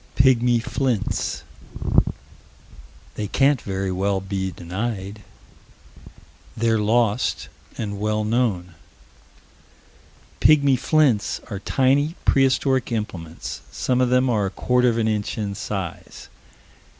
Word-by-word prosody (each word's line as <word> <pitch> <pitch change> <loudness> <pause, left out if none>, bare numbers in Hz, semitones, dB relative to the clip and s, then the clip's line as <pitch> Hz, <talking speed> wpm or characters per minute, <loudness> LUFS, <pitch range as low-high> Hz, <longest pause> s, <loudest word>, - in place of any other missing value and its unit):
"Pigmy 125 -2 +4
flints." 120 -1 -2 1.7
They 105 - -4
can't 135 +4 +2
very 95 -1 -3
well 95 +1 0
be 95 0 -3
denied. 100 +3 -5 1.4
They're 115 -1 +2
lost 115 +1 +1 0.3
and 100 -2 -4
well 105 +1 0
known. 105 -6 0 1.7
"Pigmy 140 -3 +5
flints" 135 -7 +2
are 100 - -3
tiny, 140 - +1
prehistoric 135 -1 +2
implements. 90 -8 -5
Some 125 0 0
of 125 - +2
them 125 +1 +3
are 105 -5 +1
a - - -2
quarter 125 +5 +2
of 115 - -1
an 110 -1 +1
inch 105 0 -2
in 105 -2 -2
size. 95 -3 -6
110 Hz, 105 wpm, -22 LUFS, 100-125 Hz, 1.7 s, Pigmy